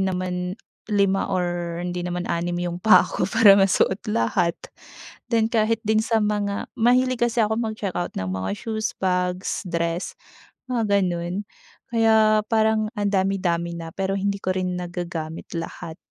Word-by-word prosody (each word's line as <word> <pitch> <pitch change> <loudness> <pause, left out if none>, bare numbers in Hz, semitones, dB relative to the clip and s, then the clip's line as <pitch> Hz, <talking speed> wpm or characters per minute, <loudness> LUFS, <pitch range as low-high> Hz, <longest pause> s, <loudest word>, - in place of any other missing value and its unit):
naman 180 -1 -2 0.3
5 200 -2 +2
or 175 -2 -2
hindi 180 0 -3
naman 175 0 -3
6 175 +1 -1
'yong 175 0 -3
paa 185 -2 +6
ko - - -2
para 200 -2 +7
masuot 195 0 +3
lahat. 170 - +1 0.8
Then 225 -1 +2
kahit 225 0 +1
din 215 0 +2
sa 225 -2 +1
mga, 205 -1 -1
mahilig 250 +2 +3
kasi 235 -1 +1
ako 220 +1 0
mag-check-out 215 -6 -3
ng 95 0 -2
mga 95 0 -3
shoes, 220 +1 -3
bags, 180 +1 -1
dress, 170 +1 -2 0.5
mga 220 -5 +1
gano'n. 180 +2 -2 0.4
Kaya 220 -2 +4
parang 220 -1 +2
ang 205 -1 +1
dami-dami 185 -3 0
na, 165 -1 -6
pero 195 0 -1
hindi 200 +1 -1
ko 185 - +1
rin 185 -1 -1
nagagamit 175 -2 -5
lahat. 165 0 -6
190 Hz, 145 wpm, -23 LUFS, 175-215 Hz, 0.8 s, para